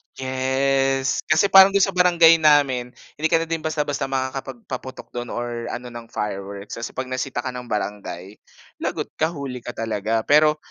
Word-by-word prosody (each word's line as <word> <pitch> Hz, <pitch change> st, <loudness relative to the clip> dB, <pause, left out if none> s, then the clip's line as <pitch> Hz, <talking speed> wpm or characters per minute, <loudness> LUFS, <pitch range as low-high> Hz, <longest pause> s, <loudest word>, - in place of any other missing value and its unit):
Yes. 135 Hz, +1 st, 0 dB
Kasi 160 Hz, +6 st, +3 dB
parang 195 Hz, +1 st, +8 dB
dun 200 Hz, -, +5 dB
sa 195 Hz, -, +2 dB
barangay 170 Hz, -2 st, +5 dB
namin, 140 Hz, -5 st, +3 dB, 0.2 s
hindi 160 Hz, -, +2 dB
ka 165 Hz, +1 st, +2 dB
na -, -, -5 dB
din 165 Hz, 0 st, -1 dB
basta 155 Hz, -1 st, -1 dB
basta 145 Hz, -2 st, -3 dB
makakapagpaputok 130 Hz, -1 st, -5 dB
dun 120 Hz, 0 st, -5 dB
or 120 Hz, -1 st, -4 dB
ano 125 Hz, 0 st, -6 dB
ng 120 Hz, -1 st, -9 dB
fireworks. 100 Hz, 0 st, -5 dB
Kasi 115 Hz, -, -6 dB
'pag 130 Hz, 0 st, -5 dB
nasita 130 Hz, -1 st, -3 dB
ka 130 Hz, -, -3 dB
ng 125 Hz, -1 st, -8 dB
barangay, 105 Hz, -2 st, -5 dB, 0.4 s
lagot -, -, -3 dB
ka, 160 Hz, -, +3 dB
huli 135 Hz, -4 st, -6 dB
ka 120 Hz, 0 st, -8 dB
talaga. 110 Hz, 0 st, -1 dB
Pero 150 Hz, +1 st, +4 dB
130 Hz, 175 wpm, -22 LUFS, 120-150 Hz, 0.4 s, parang